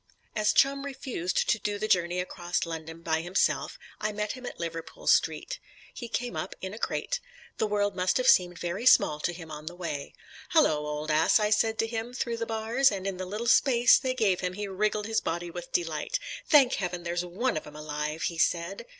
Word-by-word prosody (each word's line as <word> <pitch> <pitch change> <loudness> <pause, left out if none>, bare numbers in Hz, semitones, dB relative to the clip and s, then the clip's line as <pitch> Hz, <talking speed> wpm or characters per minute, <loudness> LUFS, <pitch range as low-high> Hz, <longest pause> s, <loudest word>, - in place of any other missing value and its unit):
As 210 -1 +3
Chum 275 0 +3
refused 260 -10 -2
to 215 - +2
do 205 0 -2
the 215 +1 -2
journey 180 -3 +2
across 175 -1 -2
London 165 0 -7
by 160 -1 0
himself, 175 +3 0 0.2
I 215 - -1
met 210 0 -2
him 255 -1 -7
at - - -8
Liverpool 165 -1 -6
Street. - - +2 0.3
He 240 - -7
came 245 +1 -3
up, 185 - -4
in 190 +1 -6
a 220 - -8
crate; - - -2 0.4
the 220 - +2
world 205 -1 0
must 185 0 +1
have 255 0 0
seemed 180 -8 +5
very 175 +9 -2
small 150 -10 +5
to 175 - -1
him 165 -2 -10
on 150 0 -8
the 175 - -5
way. 165 -6 -5 0.4
"Hallo, 155 - +3
old 150 +1 -3
ass," 155 +7 +4
I 210 0 +1
said 220 +1 +2
to - - +1
him 230 +2 -4
through 235 -2 -2
the 230 0 -3
bars, 225 +4 +2
and 195 -2 -4
in 195 -2 -2
the 185 0 -5
little 210 +5 -4
space 240 0 +5
they 255 -1 -2
gave 200 -7 +2
him 180 -1 -2
he 205 +2 -4
wriggled 210 +2 -1
his 220 0 0
body 175 +1 -3
with 175 0 -8
delight. 165 - -1 0.3
"Thank 280 -5 +6
Heaven 180 -1 -3
there's 175 +1 -1
one 190 +8 -1
of 155 - -4
'em 150 - -12
alive," 150 +1 -4
he 165 -1 -2
said. 170 - 0
190 Hz, 215 wpm, -28 LUFS, 170-225 Hz, 0.4 s, Thank